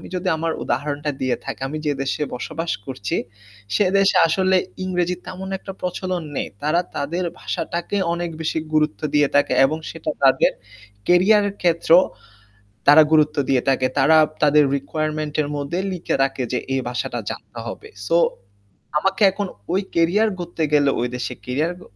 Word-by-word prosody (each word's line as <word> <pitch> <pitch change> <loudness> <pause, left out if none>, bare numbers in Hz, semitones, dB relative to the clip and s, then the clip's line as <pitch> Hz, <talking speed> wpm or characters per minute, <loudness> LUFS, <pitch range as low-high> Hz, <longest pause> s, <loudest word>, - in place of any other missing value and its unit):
যদি 180 +1 -3
আমার 165 0 -1
উদাহরণটা 145 0 -2
দিয়ে 130 -1 +1
থাকি - - -6
আমি 150 +3 -4
যে 150 - +2
দেশে 135 +2 -1
বসবাস 160 +6 -4
করছি, 100 -7 -4 0.6
সেদেশে 195 0 +3
আসলে 185 +3 +2 0.3
ইংরেজি 180 -1 0
তেমন 190 +1 -7
একটা 195 0 -8
প্রচলন 180 -1 -3
নেই। - - -2
তারা 155 +4 +2 0.2
তাদের 170 +6 -2 0.2
ভাষাটাকে 170 +4 -3 0.2
অনেক 175 0 -3
বেশি 160 0 -1
গুরুত্ব 150 -10 +1
দিয়ে 145 -1 +4
থাকে 145 - +3
এবং 155 +4 -1
সেটা - - -5
তাদের - - +5 0.6
কেরিয়ারের 200 +3 +4
ক্ষেত্রেও 170 0 +5 0.9
তারা 150 +2 +9
গুরুত্ব 155 0 +4
দিয়ে 130 -2 +3
থাকে। 130 -1 +3
তারা 150 +4 +5 0.3
তাদের 150 0 +5
রিকোয়ারমেন্ট 155 +1 -3
এর 145 - -4
মধ্যে 145 +5 -3
লিখে 180 -2 -2
রাখে 135 -1 0
যে 125 - +1 0.2
এই 135 - +1
ভাষাটা 125 - -3
জানতে - - -8
হবে। - - -8 0.2
সো, 165 - +3 0.8
আমাকে 195 +6 0
এখন 205 +1 -3 0.3
ওই 190 - +3
কেরিয়ার 175 +7 +3
গড়তে 175 -2 -4
গেলে 145 -2 +4
ওই 120 - +1
দেশে 125 - -4
কেরিয়ার 150 +7 0
ক - - -13
160 Hz, 155 wpm, -21 LUFS, 145-180 Hz, 0.9 s, তারা